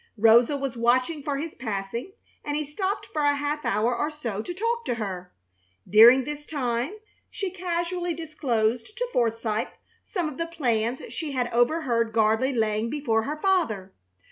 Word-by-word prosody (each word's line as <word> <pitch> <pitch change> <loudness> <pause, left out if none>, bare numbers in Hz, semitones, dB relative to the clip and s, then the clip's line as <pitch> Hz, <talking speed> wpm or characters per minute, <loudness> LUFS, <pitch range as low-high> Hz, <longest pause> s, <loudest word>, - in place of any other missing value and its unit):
Rosa 230 +6 +5
was 275 -2 -3
watching 255 +6 +2
for 280 0 -2
his 315 +3 -4
passing, 220 - -4 0.3
and 290 - -2
he 305 - -2
stopped 380 +8 -3
a 290 -1 +3
half 290 +1 -2
hour 225 +4 +1
or 295 - -1
so 240 -10 -4
to 290 - -6
talk 460 +6 -1
to 245 - -1
her. 185 -5 -5 0.6
During 235 +5 +8
this 295 +2 -6
time 255 - -2 0.3
she 390 -2 -4
casually 350 -1 -2
disclosed 265 - -1
to - - -1
Forsythe 225 -2 0 0.4
some 355 -6 -2
of 305 -1 -7
the 335 - -1
plans 245 -7 -1
she 310 -4 -4
had 245 -3 -1
overheard 240 -3 +2
Gardley 220 +4 +3
laying 220 -2 0
before 230 -6 0
her 300 +2 -4
father. 305 - 0
260 Hz, 160 wpm, -26 LUFS, 230-315 Hz, 0.6 s, During